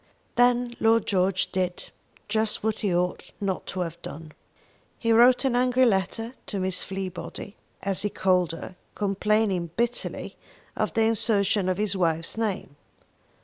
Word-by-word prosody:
Then 245 Hz, 0 st, +3 dB
Lord 225 Hz, -1 st, +4 dB
George 185 Hz, -1 st, +1 dB
did 180 Hz, -1 st, -2 dB, 0.4 s
just 220 Hz, 0 st, 0 dB
what 220 Hz, -1 st, 0 dB
he 205 Hz, -4 st, 0 dB
ought 175 Hz, +1 st, -1 dB
not 195 Hz, -2 st, -2 dB
to 185 Hz, -, -3 dB
have 170 Hz, -1 st, -4 dB
done. 155 Hz, 0 st, -8 dB, 0.7 s
He 230 Hz, -, 0 dB
wrote 245 Hz, +3 st, +6 dB
an 255 Hz, -2 st, +2 dB
angry 250 Hz, +1 st, +4 dB
letter 225 Hz, +2 st, 0 dB
to 200 Hz, -, -3 dB
Miss 185 Hz, -1 st, 0 dB
Fleabody, 190 Hz, +1 st, -6 dB, 0.3 s
as 195 Hz, -1 st, 0 dB
he 210 Hz, -, 0 dB
called 185 Hz, -4 st, +2 dB
her, 165 Hz, +2 st, -8 dB, 0.2 s
complaining 200 Hz, -3 st, +1 dB
bitterly 240 Hz, +1 st, -2 dB, 0.4 s
of -, -, 0 dB
the 225 Hz, -, +4 dB
insertion 205 Hz, -3 st, +2 dB
of 185 Hz, -, 0 dB
his 205 Hz, -1 st, 0 dB
wife's 165 Hz, -3 st, 0 dB
name. 210 Hz, -10 st, -3 dB
200 Hz, 145 wpm, -26 LUFS, 185-225 Hz, 0.7 s, wrote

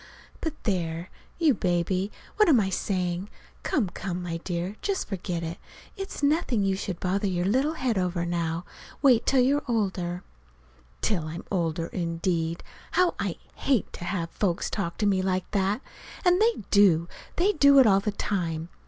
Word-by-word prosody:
But, 320 Hz, -2 st, -3 dB
there, 170 Hz, -4 st, -2 dB, 0.3 s
you 320 Hz, -5 st, +4 dB
baby! 185 Hz, 0 st, 0 dB, 0.3 s
What 425 Hz, -4 st, +5 dB
am 270 Hz, -7 st, +6 dB
I 190 Hz, -2 st, 0 dB
saying? 185 Hz, 0 st, -1 dB, 0.3 s
Come, 245 Hz, -10 st, +1 dB
come, 180 Hz, -1 st, -4 dB
my 170 Hz, -1 st, -3 dB
dear, 175 Hz, +3 st, -3 dB
just 395 Hz, -2 st, -1 dB
forget 180 Hz, -3 st, -3 dB
it. 165 Hz, +1 st, -5 dB, 0.4 s
It's 390 Hz, -7 st, -6 dB
nothing 285 Hz, -7 st, +2 dB
you 195 Hz, -1 st, +2 dB
should 190 Hz, -2 st, -4 dB
bother 195 Hz, +3 st, 0 dB
your 180 Hz, -2 st, 0 dB
little 265 Hz, +10 st, +2 dB
head 250 Hz, -9 st, 0 dB
over 180 Hz, -1 st, -1 dB
now. 170 Hz, 0 st, -2 dB, 0.4 s
Wait 250 Hz, -5 st, +5 dB
till 265 Hz, -2 st, +5 dB
you're 280 Hz, +3 st, +3 dB
older." 185 Hz, -6 st, -1 dB, 0.8 s
Till 175 Hz, -7 st, 0 dB
I'm 165 Hz, +2 st, -6 dB
older, 165 Hz, -3 st, 0 dB
indeed! 170 Hz, -1 st, -2 dB, 0.3 s
How 360 Hz, +1 st, +3 dB
I -, -, -1 dB, 0.2 s
hate 265 Hz, -7 st, 0 dB
to 175 Hz, -, -7 dB
have 170 Hz, -3 st, -2 dB
folks 180 Hz, -5 st, -1 dB
talk 175 Hz, -5 st, -3 dB
to 215 Hz, -, 0 dB
me 195 Hz, -2 st, +3 dB
like 185 Hz, -1 st, -1 dB
that! 200 Hz, +3 st, +1 dB, 0.4 s
And 360 Hz, +2 st, +5 dB
they 455 Hz, -, +2 dB
do 180 Hz, -5 st, +5 dB, 0.3 s
they 375 Hz, +4 st, +3 dB
do 280 Hz, -6 st, +6 dB
it 265 Hz, -, +8 dB
all 195 Hz, -3 st, +5 dB
the 210 Hz, +2 st, -1 dB
time. 170 Hz, -5 st, -2 dB
190 Hz, 170 wpm, -27 LUFS, 175-240 Hz, 0.8 s, it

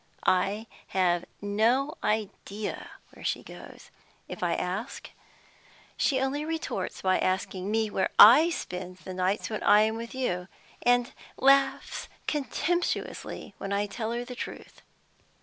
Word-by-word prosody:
I 195 Hz, +4 st, +2 dB, 0.2 s
have 180 Hz, -2 st, +1 dB, 0.2 s
no 235 Hz, +9 st, +2 dB
idea 210 Hz, -1 st, -3 dB, 0.2 s
where -, -, -13 dB
she -, -, -1 dB
goes -, -, -12 dB
to. -, -, -20 dB, 0.4 s
If -, -, -7 dB
I -, -, +1 dB
ask, -, -, -4 dB, 0.8 s
she 265 Hz, -3 st, +2 dB
only 270 Hz, +3 st, -1 dB
retorts 325 Hz, +1 st, -4 dB
by 185 Hz, -1 st, +3 dB
asking 190 Hz, 0 st, -1 dB
me 220 Hz, 0 st, 0 dB
where 190 Hz, -, 0 dB
I 270 Hz, +11 st, +9 dB
spend 180 Hz, -, -5 dB
the 185 Hz, +2 st, -8 dB
nights 185 Hz, +4 st, -1 dB
when 215 Hz, -, -3 dB
I 210 Hz, -, +6 dB
am 220 Hz, +1 st, +1 dB
with 230 Hz, +2 st, -7 dB
you, 180 Hz, -9 st, -2 dB, 0.3 s
and 245 Hz, 0 st, +2 dB, 0.2 s
laughs 275 Hz, 0 st, +3 dB, 0.2 s
contemptuously 320 Hz, +4 st, -2 dB
when 195 Hz, -, -5 dB
I 200 Hz, +1 st, +1 dB
tell 220 Hz, +2 st, -4 dB
her 240 Hz, +1 st, -3 dB
the 250 Hz, -, -7 dB
truth. 245 Hz, -, -8 dB
220 Hz, 140 wpm, -28 LUFS, 190-260 Hz, 0.8 s, I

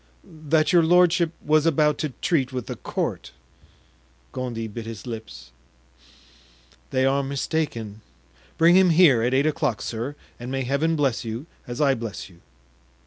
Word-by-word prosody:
"That 155 Hz, 0 st, 0 dB
your 175 Hz, -, +6 dB
lordship 175 Hz, 0 st, +3 dB
was 155 Hz, +1 st, +3 dB
about 150 Hz, -1 st, +2 dB
to 155 Hz, -, -1 dB
treat 135 Hz, -6 st, +1 dB
with 125 Hz, -2 st, -4 dB
the -, -, -6 dB
court." -, -, -4 dB, 1.0 s
Gondy 120 Hz, -3 st, -4 dB
bit 110 Hz, +1 st, -8 dB
his 110 Hz, -3 st, -8 dB
lips. 95 Hz, -, -8 dB, 1.4 s
"They 130 Hz, 0 st, +1 dB
are 135 Hz, +1 st, +2 dB
mistaken; 135 Hz, -6 st, -3 dB, 0.6 s
bring 170 Hz, +2 st, +5 dB
him 190 Hz, -1 st, +6 dB
here 160 Hz, -8 st, +5 dB
at 125 Hz, +3 st, +1 dB
eight 140 Hz, +2 st, +3 dB
o'clock, 150 Hz, -7 st, 0 dB
sir, 120 Hz, +5 st, -4 dB, 0.2 s
and 120 Hz, +1 st, -7 dB
may 135 Hz, 0 st, -1 dB
Heaven 140 Hz, +6 st, 0 dB
bless 135 Hz, -7 st, 0 dB
you 115 Hz, +4 st, -5 dB, 0.2 s
as 120 Hz, 0 st, -6 dB
I 140 Hz, -3 st, +4 dB
bless 115 Hz, -5 st, -6 dB
you!" 85 Hz, -1 st, -21 dB
135 Hz, 150 wpm, -24 LUFS, 115-155 Hz, 1.4 s, your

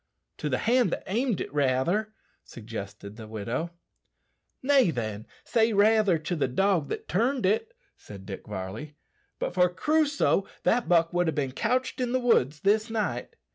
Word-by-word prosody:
"To 150 Hz, -, -2 dB
the 130 Hz, -, +1 dB
hand 240 Hz, -2 st, +2 dB
that -, -, -3 dB
aimed 230 Hz, +1 st, 0 dB
it, -, -, -6 dB
rather," 145 Hz, +10 st, +1 dB, 0.3 s
suggested 105 Hz, -2 st, -8 dB
the 110 Hz, -2 st, -9 dB
widow. 115 Hz, +9 st, -3 dB, 0.9 s
"Nay, 270 Hz, -6 st, +4 dB
then, 110 Hz, -7 st, -4 dB, 0.2 s
say 225 Hz, -1 st, +2 dB
raither 210 Hz, -3 st, +4 dB
to 160 Hz, +3 st, -3 dB
the 150 Hz, -, 0 dB
dog 175 Hz, +3 st, +1 dB
that -, -, -5 dB
turned 235 Hz, -, +1 dB
it," 325 Hz, -, 0 dB, 0.2 s
said 100 Hz, -2 st, -12 dB
Dick 95 Hz, -1 st, -8 dB
Varley. 105 Hz, +9 st, -6 dB, 0.4 s
"But -, -, -3 dB
for 180 Hz, 0 st, +4 dB
Crusoe, 290 Hz, -, +1 dB, 0.2 s
that 240 Hz, 0 st, +1 dB
buck 165 Hz, -1 st, +3 dB
would 175 Hz, 0 st, +1 dB
ha' -, -, -3 dB
bin 135 Hz, -3 st, -1 dB
couched 255 Hz, -, -1 dB
in 245 Hz, -1 st, -1 dB
the 255 Hz, -, +2 dB
woods 155 Hz, -, +2 dB
this 215 Hz, +3 st, +2 dB
night." 205 Hz, -, -3 dB
175 Hz, 165 wpm, -27 LUFS, -, 0.9 s, Nay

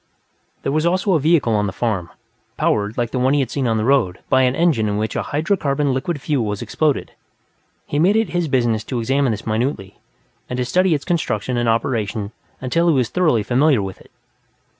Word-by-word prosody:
There -, -, -1 dB
was 155 Hz, +2 st, +1 dB
also 185 Hz, +3 st, +1 dB
a 160 Hz, -, +3 dB
vehicle 150 Hz, -6 st, +2 dB
on 105 Hz, -1 st, +1 dB
the -, -, -3 dB
farm, 95 Hz, -4 st, -2 dB, 0.5 s
powered, 105 Hz, +1 st, 0 dB
like 120 Hz, -2 st, -1 dB
the 130 Hz, -, -1 dB
one 130 Hz, +3 st, +2 dB
he -, -, +2 dB
had 130 Hz, -4 st, -1 dB
seen 135 Hz, -3 st, -1 dB
on 115 Hz, -1 st, +1 dB
the 110 Hz, -, 0 dB
road, 120 Hz, -9 st, +2 dB
by 130 Hz, -, +4 dB
an 125 Hz, 0 st, +2 dB
engine 145 Hz, -11 st, +2 dB
in 105 Hz, -, -1 dB
which 110 Hz, +1 st, -2 dB
a -, -, 0 dB
hydrocarbon 150 Hz, -4 st, 0 dB
liquid 145 Hz, +4 st, -2 dB
fuel 140 Hz, -3 st, -1 dB
was 105 Hz, +2 st, -3 dB
exploded. 145 Hz, +6 st, -1 dB, 0.7 s
He 145 Hz, -, -2 dB
made 185 Hz, +6 st, +4 dB
it 225 Hz, 0 st, +1 dB
his 175 Hz, -2 st, -1 dB
business 120 Hz, -5 st, +1 dB
to 125 Hz, -, -3 dB
examine 135 Hz, +4 st, +1 dB
this 105 Hz, -2 st, -3 dB
minutely, 110 Hz, -3 st, -2 dB, 0.5 s
and 125 Hz, -, -3 dB
to 125 Hz, -, -1 dB
study 180 Hz, +6 st, +2 dB
its 145 Hz, -, -5 dB
construction 130 Hz, -, -1 dB
and 120 Hz, -1 st, +1 dB
operation 110 Hz, -3 st, -1 dB, 0.3 s
until 165 Hz, +7 st, 0 dB
he 160 Hz, -, +3 dB
was 125 Hz, -4 st, +1 dB
thoroughly 155 Hz, -12 st, +2 dB
familiar 130 Hz, 0 st, +2 dB
with 95 Hz, -1 st, -7 dB
it. -, -, -19 dB
130 Hz, 210 wpm, -20 LUFS, 110-155 Hz, 0.7 s, by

